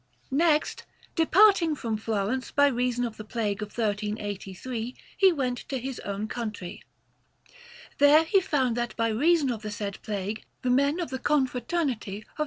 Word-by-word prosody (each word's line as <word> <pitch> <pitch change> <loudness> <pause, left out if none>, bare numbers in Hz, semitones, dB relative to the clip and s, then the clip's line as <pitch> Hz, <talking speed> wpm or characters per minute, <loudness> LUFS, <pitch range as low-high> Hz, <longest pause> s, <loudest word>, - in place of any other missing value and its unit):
Next, 305 +2 +2 0.3
departing 340 -1 +5
from 230 -5 -3
Florence 220 +3 -2
by 285 - +4
reason 245 -2 +1
of 225 -2 -6
the 215 - -7
plague 215 -2 -2
of 210 - -3
1383, 210 +2 -3 0.2
he 385 -1 +5
went 255 -6 -1
to 270 - -1
his 260 +1 -5
own 200 +2 -4
country. 215 -6 -5 1.2
There 290 +2 +7
he 380 +4 +3
found 260 -9 +1
that 240 0 -2
by 230 -1 +1
reason 290 +4 +3
of 225 -3 -4
the 215 - -5
said 205 -1 -5
plague 210 0 -4 0.2
the 250 - +1
men 280 +6 +2
of 345 - -3
the 260 - -3
Confraternity 260 - 0
of 215 - -11
S. - - -30
245 Hz, 165 wpm, -27 LUFS, 215-285 Hz, 1.2 s, There